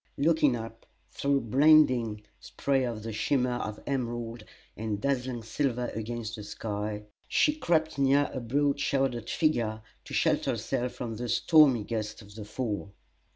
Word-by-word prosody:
Looking 150 -3 +3
up 115 0 -8 0.2
through 140 -1 +1
blinding 125 -4 +4 0.2
spray 135 -2 -1
at 110 -3 -5
the 115 0 -5
shimmer 125 +2 +1
of 110 -1 -5
emerald 120 -4 -3 0.3
and 110 -2 -3
dazzling 125 -2 -1
silver 125 0 -1
against 115 0 -4
the 105 - -7
sky, 105 0 -4 0.2
she 300 - +3
crept 160 - 0
near 140 +1 +4
a 130 - -3
broad 140 +4 0
shouldered 135 -5 0
figure 115 -9 0 0.2
to - - -10
shelter - - +2
herself 125 0 -2
from 120 -3 -5
the 120 +1 -4
stormy 145 -8 +5
gusts 110 0 -4
of 100 0 -15
the 105 0 -8
Fall. 105 -3 -4
120 Hz, 150 wpm, -29 LUFS, 110-140 Hz, 0.3 s, stormy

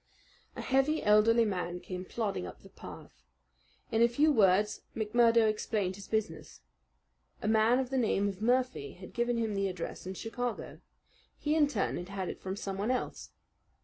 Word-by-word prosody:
A - - -5
heavy, 270 +4 +1
elderly 220 +2 +5
man 180 -3 -2
came 180 0 -6
plodding 200 - -3
up - - -11
the - - -14
path. - - -12 0.7
In 225 - +2
a 235 - +7
few 290 +6 +3
words 210 -3 +3
McMurdo 230 +1 +4
explained 210 -3 -1
his 200 0 -10
business. 215 - -3 0.8
A - - -1
man 220 +2 +4
of 260 -1 -2
the 265 - +1
name 205 -4 +2
of 195 0 -5
Murphy 245 - +1
had 185 0 -12
given 240 0 0
him 225 -2 -1
the 195 0 0
address 180 -1 -6
in 190 - -5
Chicago. 240 +4 -4 0.6
He 300 - 0
in 310 -2 +4
turn 225 -9 -1
had 175 +2 -6
had 195 -2 -3
it - - -7
from 190 0 -4
someone 200 +1 -3
else. 255 - -2
215 Hz, 175 wpm, -31 LUFS, 195-240 Hz, 0.8 s, a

